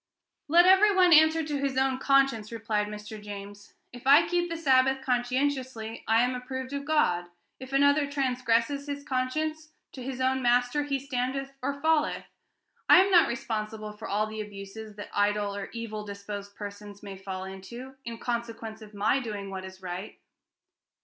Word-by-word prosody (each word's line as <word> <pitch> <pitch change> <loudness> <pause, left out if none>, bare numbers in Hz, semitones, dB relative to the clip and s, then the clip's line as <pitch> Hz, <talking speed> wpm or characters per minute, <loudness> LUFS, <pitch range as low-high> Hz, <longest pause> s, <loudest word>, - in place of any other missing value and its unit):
"Let 340 +4 +6
every 385 +2 +6
one 365 -2 +6
answer 315 +1 +6
to 295 -2 -2
his 275 -1 -1
own 265 -1 +1
conscience," 270 -6 +2
replied 220 -2 -1
Mr. 210 0 -8
James. 205 0 -9 0.2
"If 245 +1 -9
I 295 +5 +7
keep 350 0 0
the 335 - -3
Sabbath 265 -3 +3
conscientiously, 250 -2 -1
I 225 +1 +4
am 250 +1 +1
approved 260 +1 -5
of 280 0 -4
God; 285 - +2 0.3
if 260 0 -9
another 285 +1 +3
transgresses 255 0 0
his 285 0 -4
conscience, 310 +4 -2 0.2
'to 260 - -9
his 255 0 -5
own 260 0 +1
master 245 +3 +2
he 280 -1 0
standeth 270 0 -3
or 280 +2 -2
falleth.' 315 0 +1 0.6
I - - +10
am 395 - -1
not 345 -3 +7
responsible 220 -2 -4
for 220 +2 -8
all 210 +2 +1
the 215 0 -5
abuses 205 +1 -9
that 205 - -8
idle 205 0 +1
or 200 -1 -5
evil 220 -2 -5
disposed 200 0 -7
persons 205 0 -9
may 200 -1 -7
fall 190 -1 -6
into, 195 +8 -9
in 235 -2 -6
consequence 230 -2 -4
of 215 -1 -12
my 210 +6 +2
doing 205 -5 -5
what 190 -1 -5
is 190 0 -12
right." 180 +3 -6
245 Hz, 170 wpm, -28 LUFS, 210-280 Hz, 0.6 s, I